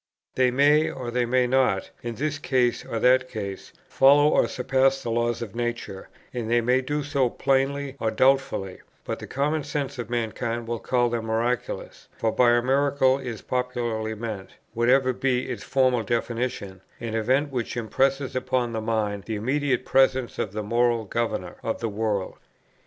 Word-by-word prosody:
They 130 -1 +3
may, 145 +4 +4
or 125 -2 -5
they 120 0 0
may 125 +1 +3
not, 125 -6 +1
in 120 -1 -5
this 145 +3 -2 0.5
or 115 - -4
that 130 +2 +3
case, 100 -4 -6 0.2
follow 145 +2 +5
or - - +3
surpass 135 +1 +1
the 115 - -3
laws 120 0 0
of 105 - -8
nature, 120 -5 -4 0.2
and 120 -3 -3
they 120 +1 +4
may 125 +3 +2
do 145 +3 -2
so 140 -3 +1
plainly 135 +2 0
or 110 - 0
doubtfully, 130 -7 +1 0.2
but - - -4
the - - -8
common 145 +3 -1
sense 140 -2 -4
of 120 - -5
mankind 115 0 -2
will 115 0 -2
call 120 0 +1
them 115 -1 -3
miraculous; 115 +2 -2
for 110 - 0
by 125 +1 +4
a 120 0 +2
miracle 135 0 +2
is 120 -5 -6
popularly 120 -3 -2
meant, 110 -3 -6 0.2
whatever 130 +3 +3
be 125 0 0
its - - -5
formal 130 -3 +2
definition, 115 -4 -3 0.2
an 115 -2 -5
event 130 +6 +1
which 125 -2 -3
impresses 135 +4 0
upon 130 -2 -1
the 110 - -2
mind 105 -3 -1
the 110 - -3
immediate 130 +3 0
presence 130 -2 +2
of 105 - -2
the 105 +1 -4
Moral 115 +1 +1
Governor 105 -5 -3
of 115 - -3
the 115 - -2
world. 105 -2 -2
120 Hz, 170 wpm, -25 LUFS, 115-135 Hz, 0.5 s, follow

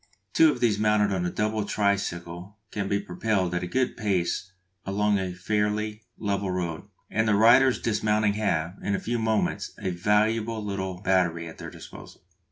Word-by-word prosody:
Two 160 -1 +6
of - - -5
these 110 -4 +2
mounted 105 -1 +3
on 90 -2 0
a - - -1
double 110 +2 -1
tricycle 100 -2 -2
can 100 -2 -2
be 100 0 +1
propelled 95 -1 -1
at 90 - 0
a 90 - -3
good 130 +7 0
pace 95 -3 -1 0.3
along 105 +1 +1
a 95 -1 -2
fairly 105 +3 -1 0.2
level 100 -2 -1
road, 90 -2 -3 0.3
and 110 0 +1
the 105 - +4
riders 120 +3 +6
dismounting 105 -1 +1
have, 90 -4 -1
in 100 - 0
a - - -2
few 120 +1 -2
moments, 110 -1 -1
a 95 - -2
valuable 110 +4 +1
little 95 -2 -3
battery 85 -3 +1
at 80 - -11
their - - -6
disposal. - - -12
100 Hz, 175 wpm, -26 LUFS, 90-110 Hz, 0.3 s, Two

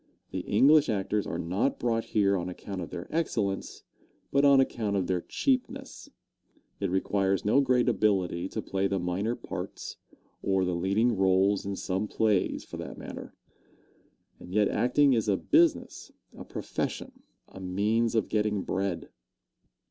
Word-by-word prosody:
The 95 - -3
English 140 +11 +4
actors 105 0 -1
are - - -3
not 95 +11 -1
brought 115 -1 0
here 100 -2 +2
on 90 -1 -2
account 95 +1 -6
of 85 - -6
their 85 - -7
excellence, 105 -12 -2 0.5
but 140 +1 +3
on 140 -1 +7
account 110 -6 0
of 95 -2 +1
their 90 -1 -1
cheapness. 260 - -2 0.7
It 100 - -1
requires 95 +1 0
no 120 +7 +4
great 125 -2 +2
ability 95 -6 +1
to - - -4
play 95 0 0
the 100 - -1
minor 95 +6 -1
parts, - - -7 0.4
or 95 -1 +1
the 90 - -1
leading 100 +7 +1
roles 95 +1 +2
in 100 - -2
some 95 +2 -2
plays, 105 -3 +1
for - - -9
that - - -7
matter. - - -9 1.0
And 90 - -11
yet 105 +1 +3
acting 135 +3 +3
is 110 -3 +1
a 100 - +3
business, 330 - +1 0.2
a - - -9
profession, 260 0 -5 0.3
a - - -12
means 105 +5 0
of 110 - +1
getting 105 -2 0
bread. 95 -3 -2
100 Hz, 155 wpm, -28 LUFS, 95-115 Hz, 1.0 s, on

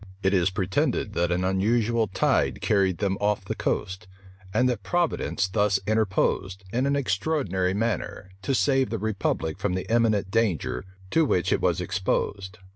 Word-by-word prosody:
It 95 +1 +2
is 90 -1 +3
pretended 105 - -1
that 85 -3 0
an 90 +1 0
unusual 110 +4 +1
tide 95 - +1
carried 95 -4 +2
them 95 0 -1
off 105 -2 0
the - - -2
coast; 95 0 -3 0.4
and 125 - +2
that 120 -4 -1
Providence 160 - 0
thus 100 0 +1
interposed, 100 -2 0
in 125 +3 +1
an 140 - +1
extraordinary 95 - 0
manner, 105 -3 -2
to 135 +6 0
save 130 +4 +2
the 115 - -2
republic 95 -5 -2
from 95 -1 -1
the 95 - -3
imminent 110 -5 +2
danger 105 -7 0 0.3
to 165 - +4
which 90 - +1
it - - 0
was - - +1
exposed. 95 +2 -2
100 Hz, 160 wpm, -26 LUFS, 95-115 Hz, 0.4 s, to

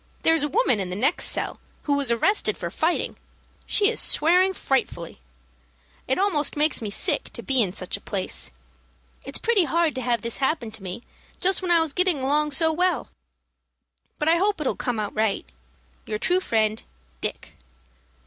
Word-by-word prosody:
There's 325 -1 +4
a 295 - +1
woman 390 - +2
in 190 -2 -2
the 180 - -3
next 270 - +2
cell, - - -1 0.2
who 290 - 0
was 280 -3 +1
arrested 235 - +1
for 170 -1 -5
fighting. 330 - -1 0.5
She 410 - +4
is 470 - 0
swearing 360 +4 +4
frightfully. 175 - -2 0.9
It 265 - +1
almost 360 -7 +1
makes 300 -2 +2
me 215 - -3
sick 200 - 0
to - - -8
be 265 -2 +2
in 195 -5 +1
such 185 +1 -4
a - - -17
place. 185 - -2 0.7
It's 275 - -4
pretty 440 -6 +2
hard 330 +2 +1
to 260 - -4
have 240 -2 0
this 235 +1 -3
happen 265 -4 -1
to 220 - -10
me 190 +5 -6 0.4
just 380 +1 +1
when 365 - -3
I 340 -1 +5
was 320 -3 -1
getting 365 -2 +2
along 295 +3 +1
so 320 +3 +2
well. 355 -4 0 1.1
But 300 - -1
I 330 +1 +5
hope 400 +1 +1
it'll 300 - 0
all - - -7
come 245 -3 -2
out 210 -1 -3
right. 215 -2 0 0.6
Your 215 - -2
true 360 +11 +2
friend, 220 - 0 0.4
"DICK. - - -4
285 Hz, 185 wpm, -24 LUFS, 220-340 Hz, 1.1 s, I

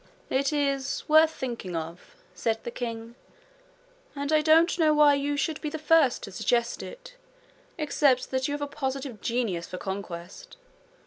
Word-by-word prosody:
'It 270 +2 +1
is 275 -2 -1
worth 315 +1 +6
thinking 235 - -5
of,' 165 +2 -7 0.2
said 225 +5 -2
the 240 - -5
king; 230 -1 -5 1.0
'and 285 +2 -2
I 310 - +5
don't 325 +3 +4
know 310 -2 +4
why 295 -1 +6
you 285 +1 -1
should 310 +1 -1
be 305 - -2
the 315 - -5
first 305 -4 +3
to - - -7
suggest 235 +5 0
it, - - -10 0.6
except 285 -4 +2
that 260 0 0
you 290 - -2
have 290 - -4
a - - 0
positive 270 -5 -4
genius 225 -8 -1
for 185 - -6
conquest. 190 - -7
275 Hz, 165 wpm, -27 LUFS, 230-300 Hz, 1.0 s, worth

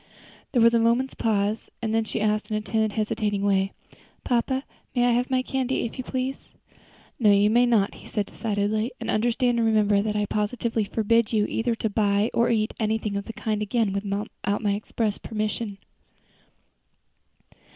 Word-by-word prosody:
There 240 -4 +3
was 230 0 +6
a 230 - +4
moment's 235 +3 +2
pause, 215 0 0
and 220 -1 -2
then 225 0 +2
she 220 - -3
asked 215 0 0
in 215 - 0
a - - -2
timid 220 -1 0
hesitating 210 -1 -1
way, 195 -1 +2 0.5
"Papa, 260 +2 0 0.3
may 245 -1 +3
I 245 - +4
have 245 +1 +1
my 255 -1 +1
candy, 265 -1 -1
if 235 - -7
you - - -2
please?" 260 +1 -4 0.7
"No, 220 -4 +4
you 205 +1 +4
may 240 +2 +4
not," 215 -4 +2
he - - -13
said 210 -2 -1
decidedly; 215 +2 -1
"and 230 -1 -2
understand 240 +2 +1
and 225 - +2
remember 210 -2 +3
that 210 0 -2
I 210 0 +1
positively 215 +1 -1
forbid 225 +2 +1
you 210 -1 +3
either 230 +1 -1
to 220 - -1
buy 205 0 +1
or 235 - +3
eat 220 -1 +1
anything 215 -2 -1
of 200 0 -3
the 225 - -7
kind 215 -1 -2
again 210 -1 0
without 200 +1 -3 0.3
my 205 -1 +2
express 210 +1 -2
permission." 215 -1 -3
220 Hz, 180 wpm, -25 LUFS, 210-235 Hz, 0.7 s, was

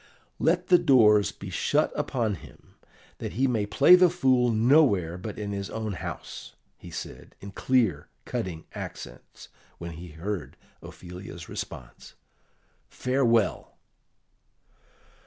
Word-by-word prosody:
"Let 175 +2 +1
the 180 -1 +7
doors 110 - +5
be - - -9
shut - - +1
upon 115 -5 -1
him, - - -13 0.5
that - - -5
he 130 +5 +1
may 115 -6 0
play 140 +11 +6
the 180 0 +7
fool 130 -8 +2
nowhere 110 - +3
but 100 +3 -7
in 105 -1 -4
his 100 -1 -4
own 110 -2 -4
house," - - -8 0.2
he 85 - -13
said, 85 0 -9
in 100 - -9
clear, 125 0 +1 0.2
cutting 85 -4 -4
accents, 60 - -9 0.3
when 85 0 -7
he 85 +2 -9
heard 90 +1 -5 0.2
Ophelia's 90 -2 -10
response. - - -8 0.7
"Farewell!" 120 -4 0
105 Hz, 120 wpm, -27 LUFS, 90-130 Hz, 0.7 s, the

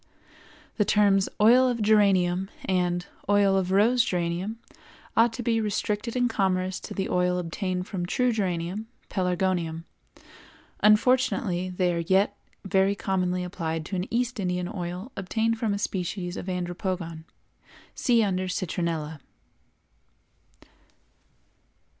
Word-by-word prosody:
The 210 - +4
terms 200 -2 +3
"Oil 245 +5 +6
of 245 -2 -1
Geranium" 195 -3 +3 0.2
and 180 -1 0 0.2
"Oil 200 -1 +4
of 190 -1 0
Rose 225 +6 +4
Geranium" 180 +4 -2 0.6
ought 230 +1 +5
to 245 - -5
be 225 -1 +1
restricted 210 +2 -2
in 245 -1 +2
commerce 190 -4 0
to - - -8
the 195 - -1
oil 180 0 +1
obtained 180 +1 -3
from 180 -3 -4
true 250 +6 +1
geranium 190 0 -2 0.2
(Pelargonium). 180 -3 -1 1.0
Unfortunately, 210 -4 +3
they 180 -1 0
are 170 - -1
yet 190 +4 +2 0.3
very 195 +1 +2
commonly 185 -3 -1
applied 165 -3 -3
to 190 - -4
an 180 +2 -3
East 245 0 -1
Indian 180 -2 -1
oil 180 +6 -5
obtained 225 +4 -1
from 225 -4 0
a 200 - 0
species 180 -2 -3
of - - -6
Andropogon 175 -2 -3 0.7
(see 235 -3 +3
under 185 -2 -1
Citronella). 165 -4 -3
190 Hz, 125 wpm, -26 LUFS, 180-210 Hz, 1.0 s, Oil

